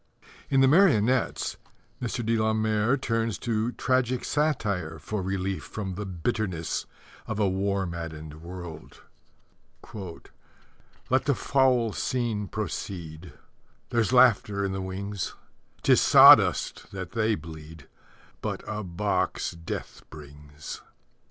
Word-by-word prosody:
In 135 -1 +4
The 135 - +6
Marionettes 130 - +3 0.4
Mr. 120 -1 -3
de 115 +1 +2
la 110 0 +1
Mare 110 +3 +1
turns 115 -4 -1
to 115 0 -1
tragic 130 -1 0
satire 105 - -1
for 105 +7 -4
relief 95 0 -2
from 100 -3 -5
the 100 +2 -5
bitterness 90 -2 -2 0.4
of 110 - -3
a 105 -2 +2
war 95 +1 0
maddened 80 -3 -7
world: 85 -2 -9 0.9
Let 100 +6 -6
the 140 -2 +2
foul 125 -5 +2
scene 115 -5 -1
proceed: 90 -6 -6 0.6
There's 115 -1 +1
laughter 105 -5 +4
in 95 - -2
the 95 0 -3
wings; 95 0 -4 0.5
'Tis - - +5
sawdust - - +6
that 95 -2 -6
they 110 -1 +1
bleed, 80 -3 -11 0.5
But - - -4
a 105 0 -3
box 95 +3 -1
Death 85 -1 -7
brings. 75 0 -10
100 Hz, 115 wpm, -27 LUFS, 85-115 Hz, 0.9 s, The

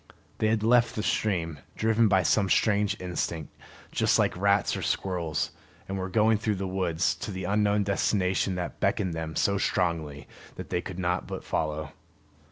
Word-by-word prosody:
They 110 - +2
had 110 -1 +1
left 120 +1 +4
the 105 - -2
stream, 85 -9 -1 0.2
driven 110 +1 +3
by 95 -2 +3
some 100 +3 +2
strange 105 -1 +2
instinct, 85 -3 -4 0.4
just - - +2
like - - +2
rats 100 +2 +2
or - - -4
squirrels, 85 -4 -1 0.4
and 95 - -4
were 95 0 -3
going 110 +1 +3
through 110 -1 0
the 95 0 -3
woods 90 -3 0
to - - -6
the 95 -2 -5
unknown 105 +2 +2
destination 95 -1 +1
that 90 -1 -5
beckoned 95 -4 0
them 80 -1 -4
so 100 +2 +2
strongly 80 -9 -1 0.3
that - - -8
they 90 - 0
could 90 0 -7
not 90 -1 -1
but - - -6
follow. 75 -1 -2
95 Hz, 175 wpm, -27 LUFS, 85-105 Hz, 0.4 s, left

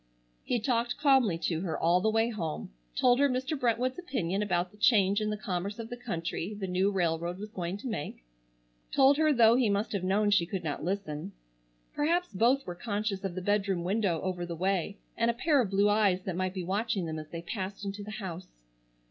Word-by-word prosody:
He 245 - 0
talked 240 +1 0
calmly 265 - +4
to 165 -1 0
her 175 -4 -2
all 175 +2 +3
the 220 - +2
way 225 +1 +2
home; 165 - -4 0.2
told 245 0 +4
her 285 0 +4
Mr. 260 +4 -1
Brentwood's 250 +3 0
opinion 205 - -2
about 180 -3 0
the 210 - -19
change 205 -3 +4
in 215 - 0
the 210 - -2
commerce 195 0 -3
of 230 -1 -6
the - - -3
country 200 -4 -4
the 195 - -2
new 185 +2 +1
railroad 170 -2 -1
was 210 +2 -8
going 180 -2 -3
to 230 - -7
make; 215 - -5 0.7
told 275 +1 +5
her 310 0 +4
though 235 -4 +6
he 245 -4 +3
must 200 +2 0
have 200 -3 -2
known 205 +3 +2
she 180 -5 +3
could 185 0 -4
not 150 -3 -3
listen. 160 - -3 0.6
Perhaps 340 +1 0
both 245 +8 +3
were 180 - -4
conscious 205 +1 -3
of 190 -3 -3
the 185 - -4
bedroom 195 -3 +1
window 190 -2 0
over 185 -2 -2
the 170 -1 -4
way 190 +3 -1 0.2
and 230 0 +1
a 235 - +1
pair 285 +2 +3
of 220 - -1
blue 200 +1 +3
eyes 205 -3 +3
that 185 - -3
might 185 +1 -2
be 185 - -3
watching 195 0 -1
them 160 -1 -4
as 155 0 -9
they 170 0 -6
passed 195 +2 -5
into 200 +1 -4
the 210 - -8
house. 190 -5 -6
200 Hz, 215 wpm, -30 LUFS, 180-230 Hz, 0.7 s, though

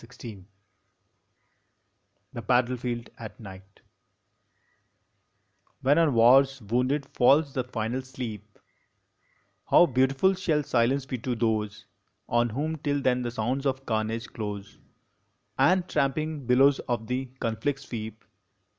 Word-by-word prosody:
ON 115 - -14
THE 125 - -16
GREAT 115 -4 -8
WAR 95 - -16 1.9
THE 120 - -5
BATTLEFIELD 120 0 0
AT 110 -2 -9
NIGHT 95 -2 -13 2.0
When 145 +5 +4
on 155 -6 +3
war 120 +4 +7
s 135 0 -6
wounded 125 +6 0
falls 140 +3 +3
the 130 - -1
final 120 +1 -3
sleep, 110 -5 -8 1.1
How - - +7
beautiful 135 +6 +2
shall 165 -6 0
silence 130 +2 +1
be 130 -2 -5
to 125 +2 -2
those 110 -3 -1 0.4
On 120 0 +2
whom 150 +8 -3
till 145 -1 -1
then 130 -2 +1
the 120 - -2
sounds 125 +5 -2
of 135 0 -2
carnage 110 0 -2
close 105 -2 -6 0.8
And 185 0 +3
tramping 150 -1 -1
billows 135 +3 +5
of 120 -2 -1
the 125 +3 -2
conflict 130 +5 -2
sweep 110 -4 -7
125 Hz, 130 wpm, -27 LUFS, 115-140 Hz, 2.0 s, war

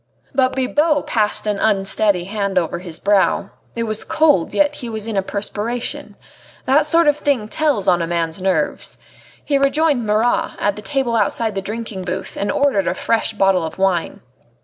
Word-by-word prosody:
But 260 -1 +2
Bibot 290 +3 +1
passed 215 -2 0
an 210 -2 -1
unsteady 200 -2 +2
hand 200 0 -3
over 175 -1 0
his 175 -3 -7
brow. 200 -1 +2 0.2
It 230 - -1
was 215 -1 -3
cold, 295 - +2
yet 295 0 +2
he 240 - -6
was 220 -2 -4
in 225 -2 -4
a 195 - +2
perspiration. 210 +4 -4 0.5
That 295 +3 +3
sort 330 +1 +3
of 295 0 +4
thing 280 -8 0
tells 280 -5 0
on 175 -2 +4
a 165 - -1
man's 170 +1 -2
nerves. 185 -5 -1 0.5
He 280 -2 +1
rejoined 280 -1 +2
Marat, 215 +3 +1
at 205 -1 0
the 210 - -8
table 265 -1 -1
outside 220 +1 0
the 195 - -2
drinking 215 -1 -5
booth, 185 +1 -5
and 200 - -1
ordered 275 -9 +1
a - - 0
fresh 225 0 0
bottle 195 -4 +2
of 160 - -6
wine. 190 -3 0
215 Hz, 180 wpm, -19 LUFS, 195-265 Hz, 0.5 s, of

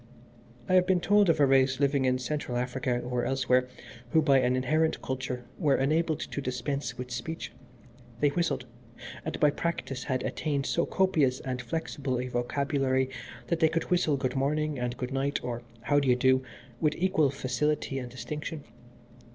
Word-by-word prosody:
"I - - +1
have 180 -1 +5
been 185 -2 +3
told 205 +1 +4
of 165 - +3
a 145 - +6
race 135 -1 +3
living 140 -1 +2
in 130 0 +3
Central 125 -1 -3
Africa, 125 0 -1
or 125 0 -2
elsewhere, 130 -1 +2 0.4
who 160 +5 +3
by 140 -3 +5
an 125 0 +2
inherent 155 +5 +1
culture 130 -1 -3
were 145 -3 +3
enabled 155 +3 +1
to 145 - -4
dispense 130 -1 -3
with 125 0 -6
speech. 120 +7 -5 0.7
They 145 - +4
whistled, 140 -5 -1 0.6
and 160 - -4
by 150 -1 +5
practice 150 -5 -3
had 130 -2 -1
attained 145 -3 -1
so 170 - +1
copious 155 -9 +2
and 125 -1 -3
flexible 135 -1 -3
a 125 0 -3
vocabulary 130 +1 0 0.3
that 165 +6 -1
they 160 -1 +5
could 165 +2 -2
whistle 165 -5 +3
good 130 -1 -2
morning 150 +1 0
and 120 0 -2
good 125 +1 -4
night, 140 +1 0
or 120 -1 -3 0.2
how 145 +3 +3
do 140 - -1
you 125 - +5
do 130 +1 +3 0.4
with 150 -1 +1
equal 180 -5 +3
facility 140 +1 -1
and 125 -1 -6
distinction. 145 +5 -6
135 Hz, 175 wpm, -29 LUFS, 125-155 Hz, 0.7 s, a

